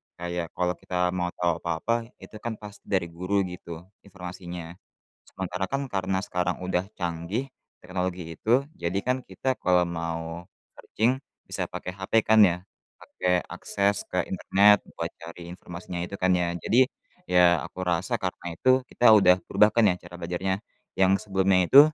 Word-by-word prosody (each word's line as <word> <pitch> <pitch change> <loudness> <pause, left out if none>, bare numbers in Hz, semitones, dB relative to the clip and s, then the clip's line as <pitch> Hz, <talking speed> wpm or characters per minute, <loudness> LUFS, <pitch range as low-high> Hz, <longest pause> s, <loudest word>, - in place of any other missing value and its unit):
Kayak 85 -1 -3
kalau 90 0 +1
kita 90 -1 0
mau 90 -1 -1
tahu 85 -2 0
apa-apa, 115 +9 -1 0.2
itu - - -12
kan 115 -2 -4
pasti 105 -1 -11
dari 95 -4 +1
guru 90 +4 0
gitu, 85 -1 -8 0.2
informasinya. 90 -2 -8 0.6
Sementara 95 0 -3
kan, 135 0 0
karena 95 0 0
sekarang 90 0 -1
udah 90 0 0 0.2
canggih, 85 +9 -2 0.4
teknologi 90 0 -3 0.2
itu. 120 +5 +3 0.2
Jadi 90 +3 -1
kan, 125 +1 +2
kita 130 -1 -2
kalau 90 -1 +4
mau 85 0 -4 0.3
searching 125 +5 0 0.3
bisa - - -2
pakai 90 - -6
HP 95 - -8
kan, 110 0 +6
ya. 85 - 0 0.4
Pakai 90 -1 0
akses 100 0 0
ke - - +1
internet 105 +1 +5 0.2
buat - - -2
cari 85 +1 -9
informasinya 90 0 -7
itu 100 - -7
kan, 95 0 +3
ya. 85 -1 0
Jadi, 120 +9 +4 0.4
ya 90 -2 +5
aku 95 - -8
rasa 90 +1 0
karena 90 -2 -4
itu 130 - +1 0.2
kita 120 - +4
udah 90 -3 +6
berubah 105 - +5
kan 115 - +5
ya 90 - +1
cara 90 0 -11
belajarnya. 90 +2 -1 0.4
Yang 95 0 +5 0.2
sebelumnya 95 -1 +3
itu 140 - +9
90 Hz, 160 wpm, -26 LUFS, 85-100 Hz, 0.6 s, itu